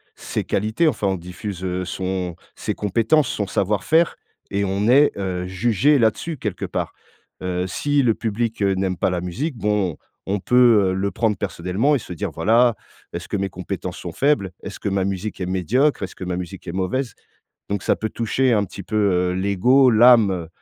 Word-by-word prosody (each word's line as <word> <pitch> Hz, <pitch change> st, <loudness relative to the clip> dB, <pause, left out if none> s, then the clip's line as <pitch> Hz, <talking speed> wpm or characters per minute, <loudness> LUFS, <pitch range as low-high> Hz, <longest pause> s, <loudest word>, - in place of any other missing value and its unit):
ses -, -, -4 dB
qualités. 110 Hz, -, 0 dB
Enfin 100 Hz, -, -1 dB
on 95 Hz, -, +1 dB
diffuse, 90 Hz, +2 st, -7 dB
heu, 90 Hz, 0 st, -2 dB
son 90 Hz, -1 st, -3 dB, 0.2 s
ses -, -, -3 dB
compétences, 115 Hz, +8 st, +2 dB
son 105 Hz, -2 st, -2 dB
savoir-faire 105 Hz, -, +1 dB, 0.3 s
et 100 Hz, 0 st, 0 dB
on 100 Hz, +3 st, -1 dB
est, 145 Hz, +3 st, +6 dB
heu, 90 Hz, -2 st, -3 dB
jugé 115 Hz, +9 st, +2 dB
là-dessus 120 Hz, +8 st, +1 dB
quelque 105 Hz, -6 st, -4 dB
part. -, -, -3 dB, 0.5 s
Heu, 90 Hz, 0 st, -2 dB
si 145 Hz, +9 st, +1 dB
le 115 Hz, -2 st, +3 dB
public, 115 Hz, 0 st, -2 dB
heu, 100 Hz, -1 st, +3 dB
n'aime 95 Hz, -1 st, -1 dB
pas -, -, +1 dB
la 90 Hz, -1 st, -2 dB
musique, 125 Hz, -, -3 dB
bon 105 Hz, -6 st, 0 dB, 0.3 s
on 100 Hz, +1 st, 0 dB
peut, 115 Hz, -3 st, +4 dB
heu, -, -, -1 dB
le 100 Hz, +1 st, -1 dB
prendre 110 Hz, -3 st, 0 dB
personnellement 100 Hz, -, 0 dB
et -, -, 0 dB
se 90 Hz, -, -11 dB
dire: 80 Hz, -, -4 dB
«Voilà, 115 Hz, +6 st, +3 dB, 0.4 s
est-ce -, -, -5 dB
que 105 Hz, -, -1 dB
mes 100 Hz, 0 st, -1 dB
compétences 90 Hz, 0 st, -5 dB
sont 85 Hz, -, -6 dB
faibles? 135 Hz, -, +1 dB
Est-ce -, -, -7 dB
que -, -, -2 dB
ma 95 Hz, -1 st, 0 dB
musique 100 Hz, +2 st, -4 dB
est -, -, -1 dB
médiocre? 100 Hz, -, +1 dB
Est-ce 95 Hz, -, -6 dB
que -, -, -8 dB
ma 90 Hz, -1 st, -2 dB
musique 90 Hz, +1 st, -7 dB
est 85 Hz, -, -3 dB
mauvaise?» 115 Hz, +8 st, -2 dB, 0.6 s
donc 100 Hz, -2 st, -1 dB
ça -, -, +2 dB
peut 110 Hz, -, -3 dB
toucher 120 Hz, +2 st, +1 dB
un 105 Hz, -, +2 dB
petit 100 Hz, +1 st, -9 dB
peu, 110 Hz, +4 st, -4 dB
heu, 90 Hz, -3 st, +2 dB
l'ego, 100 Hz, +8 st, +4 dB
l'âme. 115 Hz, -2 st, +6 dB
Heu, 85 Hz, -4 st, -4 dB
100 Hz, 200 wpm, -22 LUFS, 90-115 Hz, 0.6 s, est